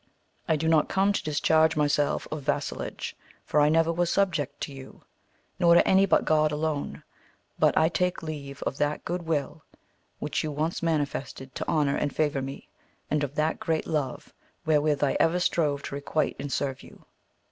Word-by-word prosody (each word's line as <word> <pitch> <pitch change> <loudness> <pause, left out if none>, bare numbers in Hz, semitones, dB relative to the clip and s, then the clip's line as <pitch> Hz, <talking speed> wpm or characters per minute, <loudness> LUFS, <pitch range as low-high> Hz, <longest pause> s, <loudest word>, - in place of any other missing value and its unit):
I 160 - +3
do 155 +2 -1
not 160 -2 +3
come 195 +1 +2
to - - -2
discharge 160 +1 +3
myself 145 -1 +1
of 155 -1 -3
vassallage, 145 +1 -3 0.3
for 150 - +2
I 145 - +5
never 165 +1 +3
was 175 0 0
subject 165 -8 0
to 140 - -4
you, 135 -1 -12 0.6
nor 170 -1 +6
to - - +5
any 190 +1 +5
but - - +3
God 155 -1 +3
alone; 150 -1 -3 0.6
but - - +3
I 160 - +5
take 180 +1 -1
leave 140 -3 -6
of 135 - -3
that 145 +1 -1
good 175 -1 -3
will 155 0 -2 0.6
which - - -2
you 155 - -2
once 155 +4 -2
manifested 145 -4 -2
to - - -5
honour 145 -2 +1
and 145 - -1
favour 145 -3 +1
me, 135 +1 -7 0.4
and 150 0 +1
of 145 0 -4
that 155 +1 0
great 160 -1 -1
love 145 -5 -3 0.3
wherewith 150 -2 +2
I 140 - +2
ever 165 +2 +3
strove 150 -5 +1
to - - -6
requite 145 +2 -1
and 140 0 -5
serve 135 -1 -2
you. - - -16
150 Hz, 180 wpm, -27 LUFS, 145-160 Hz, 0.6 s, nor